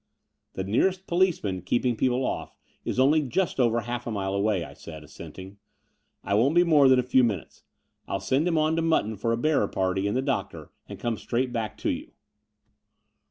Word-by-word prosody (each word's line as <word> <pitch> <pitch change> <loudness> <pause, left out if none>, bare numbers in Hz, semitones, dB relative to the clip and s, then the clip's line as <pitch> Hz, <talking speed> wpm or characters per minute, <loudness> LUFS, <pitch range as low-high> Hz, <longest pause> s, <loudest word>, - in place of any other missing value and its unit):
The 95 - -3
nearest 185 - +1
policeman 170 - 0
keeping 120 +6 0
people 125 +2 +1
off - - -4 0.3
is - - -2
only 145 +4 +4
just 150 +3 -1
over 120 -2 +2
half 120 +1 -5
a - - -2
mile 95 -2 -2
away," 100 -2 +1
I - - -10
said, 80 -2 -10
assenting. 95 +6 -11 0.6
I 100 - -2
won't 125 +10 +3
be 175 - +6
more 150 -6 +5
than 130 - +6
a 125 - +2
few 125 +1 +3
minutes. 105 -8 -3 0.5
I'll 95 - -2
send 130 - +1
him 165 -2 +1
on 155 +1 +2
to - - +2
Mutton 160 -10 +1
for 115 +3 -1
a 115 - +1
bearer 150 -5 +2
party 95 +1 -1
and 105 - 0
the 130 - 0
doc 135 -2 -1
tor, - - -11 0.2
and - - -8
come 115 -2 -2
straight 120 +5 -2
back 110 -3 -3
to - - -1
you. - - -6
120 Hz, 205 wpm, -26 LUFS, 100-140 Hz, 0.6 s, be